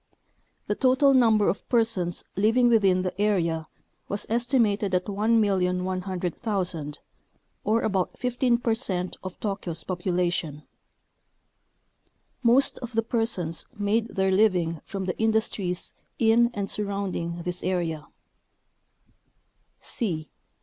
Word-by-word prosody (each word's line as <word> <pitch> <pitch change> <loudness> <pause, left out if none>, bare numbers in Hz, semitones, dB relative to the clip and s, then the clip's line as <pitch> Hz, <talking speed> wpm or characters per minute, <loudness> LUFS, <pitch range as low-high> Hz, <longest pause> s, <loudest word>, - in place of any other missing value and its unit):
The - - 0
total 260 +4 +4
number 225 -5 +4
of - - -2
per 235 -2 +5
sons 180 -6 -2
living 225 +5 +3
within 195 -5 +3
the 185 +2 -3
area 170 -6 +1 0.4
was 205 - -1
estimated 225 -5 +1
at 180 - 0
1,100,000 185 -4 0 0.7
or 220 +2 +2
about 195 -4 -1
15 245 -1 +1
percent 220 -7 -1
of 185 -1 -7
Tokyo's 190 -6 -4
popu 185 0 -3
lation. 175 -4 -1 1.8
Most 255 +3 +4
of 245 -1 -7
the 225 0 +1
persons 225 -8 -1
made 210 +2 +1
their 190 -3 0
living 180 -5 +2
from 195 -1 -4
the 180 - -2
industries 220 -5 0 0.2
in 235 +1 +4
and 200 -1 -2
surrounding 195 -5 -3
this 180 0 -3
area. 170 -4 -2
200 Hz, 110 wpm, -26 LUFS, 180-225 Hz, 1.8 s, per